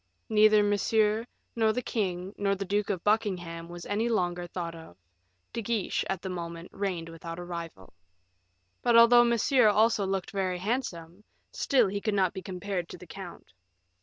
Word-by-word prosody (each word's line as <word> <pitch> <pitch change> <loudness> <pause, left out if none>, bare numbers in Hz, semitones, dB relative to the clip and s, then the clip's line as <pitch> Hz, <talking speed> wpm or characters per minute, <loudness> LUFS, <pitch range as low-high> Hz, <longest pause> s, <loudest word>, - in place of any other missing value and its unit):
Neither 215 -1 +5
Monsieur, 210 +2 +2 0.3
nor 220 -2 +3
the 250 - -2
king, 190 -4 -2
nor 200 -1 0
the 195 +1 -4
Duke 205 +2 0
of 185 -4 -2
Buckingham, 180 -6 -1
was 175 0 -8
any 215 +3 0
longer 175 -5 -1
thought 170 -1 -5
of; 160 - -12 0.6
De 230 - -2
Guiche 220 -2 -1
at 190 -2 -2
that 190 - -4
moment 170 -1 -6
reigned 185 -4 -3
without 165 0 -8
a 175 - -6
rival. 170 - -8 0.9
But 240 -1 +4
although 240 +1 +8
Monsieur 235 +1 +3
also 215 0 +3
looked 195 -1 -2
very 190 -2 -1
handsome, 185 -4 -4 0.3
still 255 -6 +2
he 200 +1 -3
could 215 -1 0
not 190 -3 +2
be 190 - -6
compared 185 -1 -4
to - - -8
the 180 - -12
count. 180 - -10
195 Hz, 170 wpm, -28 LUFS, 175-215 Hz, 0.9 s, although